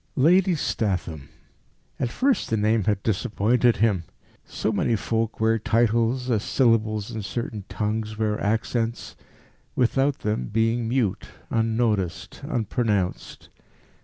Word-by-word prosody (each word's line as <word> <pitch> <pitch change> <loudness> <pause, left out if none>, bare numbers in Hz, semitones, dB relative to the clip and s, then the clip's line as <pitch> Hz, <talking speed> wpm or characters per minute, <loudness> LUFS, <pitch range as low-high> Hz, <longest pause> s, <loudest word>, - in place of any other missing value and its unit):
Lady 180 +6 +4
Statham! 90 - -2 0.7
At 125 - 0
first 265 - +1
the 110 - +1
name 110 0 +2
had 105 -2 0
disappointed 110 +3 +2
him. 100 -5 +1 0.4
So 110 - -2
many 110 +2 +1
folk 110 +1 -2
wear 110 0 +2
titles, 115 +3 +1
as 110 -3 +2
syllables 110 -5 +1
in 110 - -4
certain 105 -1 -5
tongues 105 0 -2
wear 105 -1 -1
accents 115 +2 -1 0.6
without 135 +3 +1
them 105 -13 -1
being 115 +1 0
mute, 120 -6 0 0.2
unnoticed, 110 -5 -1
unpronounced. 110 - -2
110 Hz, 115 wpm, -24 LUFS, 105-120 Hz, 0.7 s, Lady